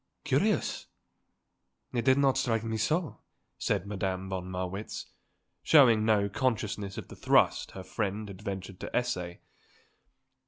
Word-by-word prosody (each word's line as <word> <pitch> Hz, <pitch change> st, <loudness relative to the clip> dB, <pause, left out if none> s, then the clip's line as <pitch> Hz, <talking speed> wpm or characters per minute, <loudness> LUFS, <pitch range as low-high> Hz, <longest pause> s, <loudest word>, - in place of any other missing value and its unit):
"Curious? -, -, +1 dB, 1.1 s
It 120 Hz, -2 st, -1 dB
did 130 Hz, 0 st, +5 dB
not 140 Hz, -2 st, +4 dB
strike 120 Hz, -4 st, 0 dB
me 110 Hz, -1 st, -2 dB
so," 155 Hz, -, 0 dB, 0.4 s
said 100 Hz, -3 st, 0 dB
Madame 95 Hz, -2 st, -3 dB
von 95 Hz, -1 st, -4 dB
Marwitz, 95 Hz, +3 st, -4 dB, 0.6 s
showing 120 Hz, -8 st, +6 dB
no 105 Hz, -2 st, +3 dB
consciousness 105 Hz, -4 st, -2 dB
of -, -, -6 dB
the -, -, -9 dB
thrust -, -, +3 dB
her 95 Hz, -, -7 dB
friend 105 Hz, +2 st, -3 dB
had 100 Hz, -1 st, -10 dB
ventured 95 Hz, -2 st, -6 dB
to -, -, -6 dB
essay. 90 Hz, -9 st, -2 dB
105 Hz, 130 wpm, -30 LUFS, 95-120 Hz, 1.1 s, showing